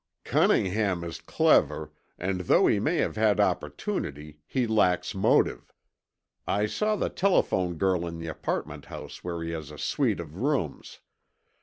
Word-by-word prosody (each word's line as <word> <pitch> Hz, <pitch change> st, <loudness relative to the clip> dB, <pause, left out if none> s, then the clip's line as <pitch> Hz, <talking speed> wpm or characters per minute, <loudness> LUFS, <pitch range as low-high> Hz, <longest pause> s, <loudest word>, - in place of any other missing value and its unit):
"Cunningham 95 Hz, -2 st, +2 dB
is 85 Hz, -1 st, -6 dB
clever, -, -, +2 dB, 0.3 s
and 95 Hz, +1 st, -2 dB
though 90 Hz, -, +4 dB
he -, -, +3 dB
may -, -, +1 dB
have -, -, 0 dB
had 105 Hz, -3 st, +3 dB
opportunity, 75 Hz, +1 st, -2 dB
he 130 Hz, -2 st, 0 dB
lacks 90 Hz, -5 st, +2 dB
motive. 95 Hz, -, +2 dB, 0.8 s
I 105 Hz, +1 st, +1 dB
saw 215 Hz, -, 0 dB
the -, -, -1 dB
telephone 95 Hz, -, +1 dB
girl 90 Hz, 0 st, +1 dB
in 85 Hz, 0 st, -6 dB
the 85 Hz, -, -7 dB
apartment 80 Hz, -, -4 dB
house -, -, -9 dB
where 85 Hz, -2 st, -4 dB
he 85 Hz, -, -4 dB
has 80 Hz, -3 st, -5 dB
a 75 Hz, -, -10 dB
suite -, -, 0 dB
of 80 Hz, 0 st, -8 dB
rooms. 130 Hz, -, -2 dB
90 Hz, 150 wpm, -27 LUFS, 85-105 Hz, 0.8 s, though